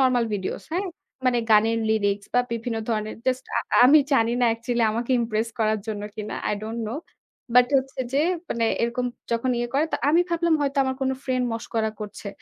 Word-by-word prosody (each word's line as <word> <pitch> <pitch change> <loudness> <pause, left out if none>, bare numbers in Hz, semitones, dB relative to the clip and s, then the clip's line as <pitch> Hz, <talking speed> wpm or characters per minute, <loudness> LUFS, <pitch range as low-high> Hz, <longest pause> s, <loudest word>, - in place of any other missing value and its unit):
normal 255 -3 +3
videos, 190 -2 -4
হ্যাঁ? 380 +3 0 0.4
মানে 245 -1 +3
গানের 225 +1 +5
lyrics 205 -2 +1
বা 245 - +6
বিভিন্ন 230 0 -3
ধরনের 215 -1 -1
just 255 0 0
আ - - +3 0.3
আমি 295 +4 +8
জানিনা 240 0 +3
actually 235 0 0
আমাকে 235 +3 -3
impress 225 0 -1
করার 215 -1 +2
জন্য 210 -2 -4
কিনা? 215 -1 -5 0.3
don't 225 +2 -4
know। 240 +7 -3 0.6
But 250 0 +7
হচ্ছে 265 0 -5
যে 275 - +2 0.3
মানে 230 0 0 0.2
এরকম 245 +1 0 0.3
যখন 235 +2 0
ইয়ে 240 0 -1
করে 295 +3 +3
তো - - +2
আমি 330 +4 +5
ভাবলাম 340 -1 +2
হয়তো 280 0 -1
আমার 260 0 -2
কোন 265 - +1
friend 255 -1 0
মশকরা 225 -1 -2
করছে। 210 -1 -7
235 Hz, 185 wpm, -24 LUFS, 220-260 Hz, 0.6 s, আমি